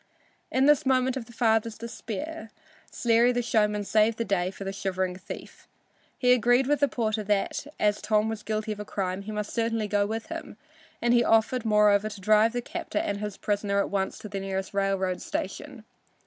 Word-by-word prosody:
In 260 +1 +3
this 295 0 +5
moment 260 -1 +2
of 260 -3 -4
the - - -13
father's 225 -2 +1
despair, 230 +4 -6 0.4
Sleary 235 0 +3
the 245 0 -1
showman 210 -2 +1
saved 215 +2 +2
the 230 - -1
day 185 -2 0
for 195 - -8
the 195 0 -4
shivering 190 -2 -2
thief. 190 +2 -10 0.5
He 250 -1 +4
agreed 245 +2 +3
with 290 +2 +1
the 285 - +4
porter 220 -4 -1
that 205 +6 -1
as 210 0 +2
Tom 215 0 +2
was 220 -1 -4
guilty 215 0 -2
of 210 - -5
a - - -3
crime 190 -2 -3
he 210 +2 -7
must 210 -1 -4
certainly 225 -2 0
go 205 0 +1
with 225 +1 -4
him, - - -7 0.5
and 240 0 +3
he 240 0 +5
offered, 225 +2 +2
moreover, 210 -1 +4
to 205 - -9
drive 215 +3 +4
the 245 0 -2
captor 210 - -5
and 200 0 -1
his 210 -2 -5
prisoner 205 -1 -1
at 200 - 0
once 195 -1 -1
to - - -8
the 200 -1 -4
nearest 195 0 -4
railroad 195 -2 0
station. 255 +4 -5
215 Hz, 200 wpm, -27 LUFS, 200-235 Hz, 0.5 s, this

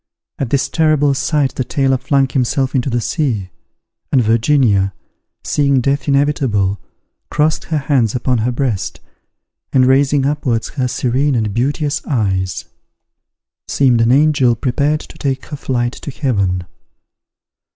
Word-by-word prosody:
At 135 - -2
this 140 +1 +1
terrible 155 -3 +2
sight 140 -1 0
the 130 - -3
sailor 135 -2 +1
flung 135 +1 +2
himself 130 +1 0
into 135 +1 0
the 120 -1 -1
sea; 115 - -2 0.6
and 135 - +4
Virginia, 115 -4 +2 0.5
seeing 140 -2 +2
death 140 +4 -1
inevitable, 135 -9 +1 0.5
crossed 155 +1 0
her 160 - -1
hands 135 -6 +1
upon 125 0 0
her 120 +3 0
breast, 120 -5 -2 0.7
and 130 -1 +4
raising 135 +1 +3
upwards 135 -6 -1
her 130 -4 -2
serene 130 +3 0
and 110 -3 -1
beauteous 145 +5 -1
eyes, 95 - -1 1.0
seemed 125 -4 +2
an 115 +1 +3
angel 140 -3 +3
prepared 140 +6 0
to - - -14
take 135 -2 -2
her 150 - -7
flight 120 -3 -2
to - - -8
Heaven. 100 -10 -1
130 Hz, 135 wpm, -17 LUFS, 120-145 Hz, 1.0 s, and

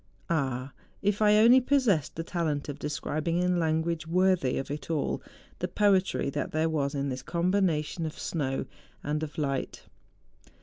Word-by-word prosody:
Ah! 135 -4 -1 0.3
if 205 +1 +1
I 210 0 +6
only 240 +4 +7
possessed 235 - +2
the 165 - -3
talent 160 -4 -2
of 145 - -6
describing 155 +3 -2
in 180 0 +2
language 160 0 0
worthy 180 -5 +2
of 135 - -4
it 145 0 -6
all 155 -4 -1 0.4
the 180 - -1
poetry 190 -6 +2
that - - -3
there 160 +1 +1
was 145 -3 -1
in 140 0 -1
this 130 -1 -4
combination 170 -1 0
of 155 - -8
snow 135 -5 -2 0.4
and 150 +1 -1
of 155 -2 -6
light. 140 -3 -2
160 Hz, 160 wpm, -28 LUFS, 145-180 Hz, 0.4 s, only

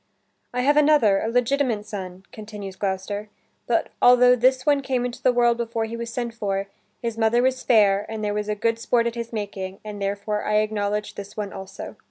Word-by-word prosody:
"I 250 - -1
have 290 +3 +3
another, 290 -10 +5
a - - -2
legitimate 245 -2 +1
son," 190 -3 -7
continues 210 -3 -8
Gloucester, 200 +2 -3 0.4
"but - - +1
altho 250 0 +7
this 255 +1 +2
one 285 -1 +3
came 260 -2 -1
into 245 -1 -6
the 255 - +4
world 240 -1 +3
before 230 -1 -2
he 225 +1 -6
was 230 0 -5
sent 235 -1 -3
for, 195 -3 -2 0.4
his 230 -1 -3
mother 230 +2 +3
was 260 0 +1
fair 205 -3 +3
and 220 -1 -5
there 205 - -1
was 210 0 -3
good 230 +1 +1
sport 235 0 +1
at 235 - -1
his 235 -1 -5
making, 195 -3 -5
and 205 -1 -7
therefore 200 +1 -2
I 210 - 0
acknowledge 210 -1 0
this 200 +1 -9
one 205 -2 -4
also." 190 0 -8
220 Hz, 200 wpm, -24 LUFS, 205-245 Hz, 0.4 s, altho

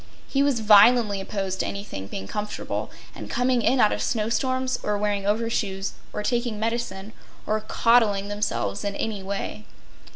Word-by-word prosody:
He 275 - +1
was 280 -5 +2
violently 210 -1 +6
opposed 195 -1 -3
to - - 0
anybody 200 - -6
being 95 -1 -6
comfortable, 210 - -4 0.2
and - - -9
coming 250 0 +1
in 260 +3 +2
out 210 - +5
of - - -2
snow 220 -2 0
storms, 260 +1 0
or 210 0 -1
wearing 205 -1 -1
overshoes, 205 -3 -1 0.2
or 210 - -4
taking 235 -1 -1
medicine, 220 -3 -3 0.3
or 215 0 0
coddling 215 -3 +3
themselves 120 - -2
in 200 -1 -2
any 215 -2 -3
way. 200 +2 -5
210 Hz, 160 wpm, -25 LUFS, 200-235 Hz, 0.3 s, violently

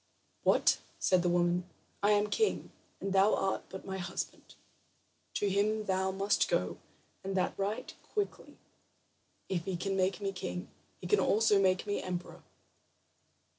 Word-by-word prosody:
"What?" - - +4 0.2
said 185 -1 +3
the 175 - +1
woman. 175 +1 +1 0.3
"I 205 - +3
am 205 0 +3
king, 440 -1 +1 0.3
and 195 0 -2
thou 195 +2 +5
art 195 0 -1
but 190 - -8
my 190 0 -4
husband. 180 - -5 0.8
To 205 - +1
him 210 +2 +1
thou 190 -1 +1
must 195 +2 +1
go, - - 0 0.4
and 195 0 -2
that 185 - +1
right 200 +2 -3 0.2
quickly. 415 -2 -3 0.9
If 175 -3 -2
he 190 -2 -2
can 195 +2 -1
make 185 -1 +1
a 200 -1 -1
king, 185 -1 -5 0.3
he - - -10
can 415 - +3
also 210 -1 +4
make 185 -1 +2
an 205 - -3
emperor. 180 -1 -5
195 Hz, 150 wpm, -32 LUFS, 185-205 Hz, 0.9 s, thou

